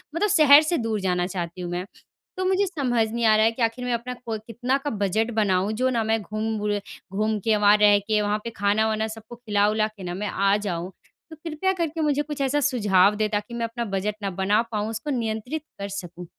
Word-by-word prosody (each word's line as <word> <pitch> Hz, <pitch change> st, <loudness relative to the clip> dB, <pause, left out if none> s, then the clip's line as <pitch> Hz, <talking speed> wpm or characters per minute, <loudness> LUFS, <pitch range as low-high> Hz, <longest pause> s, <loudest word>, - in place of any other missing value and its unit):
मतलब 415 Hz, +5 st, +1 dB
शहर 300 Hz, -4 st, +7 dB
से 320 Hz, +2 st, 0 dB
दूर 225 Hz, -2 st, -1 dB
जाना 180 Hz, -1 st, 0 dB
चाहती 180 Hz, -1 st, -5 dB
हूँ 175 Hz, -1 st, -5 dB
मैं। 175 Hz, +1 st, -3 dB, 0.5 s
तो 370 Hz, -, -1 dB
मुझे 380 Hz, +2 st, +2 dB
समझ 250 Hz, -10 st, 0 dB
नहीं 235 Hz, 0 st, -1 dB
आ 215 Hz, -1 st, +6 dB
रहा 215 Hz, 0 st, +4 dB
है 225 Hz, -, +3 dB
कि 230 Hz, -, -8 dB
आखिर 230 Hz, +2 st, 0 dB
मैं 250 Hz, -, 0 dB
अपना 235 Hz, +2 st, -3 dB
को 225 Hz, -2 st, -2 dB
कितना 245 Hz, +4 st, -1 dB
का -, -, +1 dB
बजट 215 Hz, +1 st, 0 dB
बनाऊँ 190 Hz, 0 st, +1 dB
जो 255 Hz, +4 st, +1 dB
ना 230 Hz, -3 st, 0 dB
मैं 220 Hz, 0 st, 0 dB
घूम 215 Hz, +2 st, -3 dB
बुरे 205 Hz, -1 st, -1 dB, 0.3 s
घूम 215 Hz, +2 st, 0 dB
के 220 Hz, +2 st, +1 dB
वहाँ 205 Hz, 0 st, +5 dB
रह 210 Hz, -1 st, +6 dB
के, 210 Hz, +1 st, 0 dB
वहाँ 210 Hz, 0 st, 0 dB
पे 235 Hz, -, -4 dB
खाना-वाना 220 Hz, +2 st, +1 dB
सबको 220 Hz, +1 st, -10 dB
खिला-विला 215 Hz, -2 st, +1 dB
के 215 Hz, -3 st, -13 dB
ना 175 Hz, -, -4 dB
मैं 205 Hz, +3 st, -3 dB
आ 195 Hz, 0 st, +2 dB
जाऊँ। 185 Hz, -3 st, -4 dB, 0.4 s
तो -, -, -8 dB
कृपया 325 Hz, +5 st, 0 dB
करके 330 Hz, -3 st, -2 dB
मुझे 295 Hz, -2 st, +1 dB
कुछ 295 Hz, -1 st, -6 dB
ऐसा 275 Hz, +2 st, +1 dB
सुझाव 210 Hz, -8 st, +3 dB
दें, 215 Hz, 0 st, +1 dB
ताकि 210 Hz, +2 st, -3 dB
मैं 235 Hz, -1 st, -2 dB
अपना 235 Hz, +1 st, -4 dB
बजट 200 Hz, 0 st, -2 dB
न 200 Hz, -, 0 dB
बना 200 Hz, +4 st, +2 dB
पाऊँ 210 Hz, 0 st, -2 dB
उसको 225 Hz, +7 st, -5 dB
नियंत्रित 235 Hz, +4 st, -3 dB, 0.2 s
कर 200 Hz, -, -3 dB
सकूँ। 180 Hz, -2 st, -7 dB
220 Hz, 230 wpm, -24 LUFS, 205-245 Hz, 0.5 s, शहर